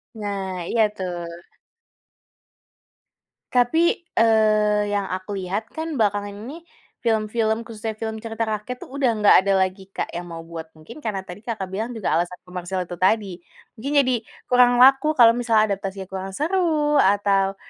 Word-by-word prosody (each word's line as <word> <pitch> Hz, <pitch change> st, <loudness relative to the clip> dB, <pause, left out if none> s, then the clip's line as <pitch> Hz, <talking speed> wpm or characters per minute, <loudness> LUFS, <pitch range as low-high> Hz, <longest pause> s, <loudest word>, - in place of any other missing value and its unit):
Nah, 200 Hz, -3 st, -4 dB
iya 230 Hz, -, +3 dB
tuh. 185 Hz, -3 st, -4 dB, 2.4 s
Tapi, 320 Hz, +8 st, +2 dB, 0.2 s
eee, 215 Hz, -2 st, +3 dB
yang 200 Hz, -1 st, -1 dB
aku 185 Hz, +2 st, -5 dB
lihat 200 Hz, +5 st, -4 dB
kan 320 Hz, -1 st, -4 dB
belakangan 205 Hz, -3 st, 0 dB
ini 250 Hz, +10 st, -8 dB, 0.4 s
film-film 220 Hz, 0 st, 0 dB
khususnya 220 Hz, -1 st, -6 dB
film 220 Hz, 0 st, -5 dB
cerita 225 Hz, 0 st, -3 dB
rakyat 220 Hz, +3 st, -4 dB
tuh -, -, -13 dB
udah 275 Hz, -2 st, +1 dB
nggak 210 Hz, -, +7 dB
ada 195 Hz, -, +3 dB
lagi 190 Hz, +1 st, -5 dB
Kak -, -, -3 dB
yang 175 Hz, +1 st, -6 dB
mau 165 Hz, -1 st, -8 dB
buat. 165 Hz, -1 st, -8 dB
Mungkin 155 Hz, -, -12 dB
karena 210 Hz, -8 st, -3 dB
tadi 180 Hz, +1 st, -10 dB
Kakak 210 Hz, -6 st, -4 dB
bilang 225 Hz, +5 st, -4 dB
juga 220 Hz, -, -2 dB
alasan 175 Hz, +1 st, -2 dB
komersil 180 Hz, 0 st, -4 dB
itu 175 Hz, 0 st, -8 dB
tadi. 190 Hz, -1 st, +1 dB, 0.4 s
Mungkin 275 Hz, +6 st, -4 dB
jadi 255 Hz, -1 st, +1 dB, 0.4 s
kurang 245 Hz, 0 st, +6 dB
laku 275 Hz, +4 st, +5 dB
kalau 235 Hz, -3 st, +7 dB
misalnya 225 Hz, -3 st, +2 dB
adaptasinya 195 Hz, 0 st, -4 dB
kurang 190 Hz, 0 st, -5 dB
seru, 310 Hz, -, +1 dB
atau 195 Hz, -2 st, +2 dB
215 Hz, 155 wpm, -23 LUFS, 190-235 Hz, 2.4 s, nggak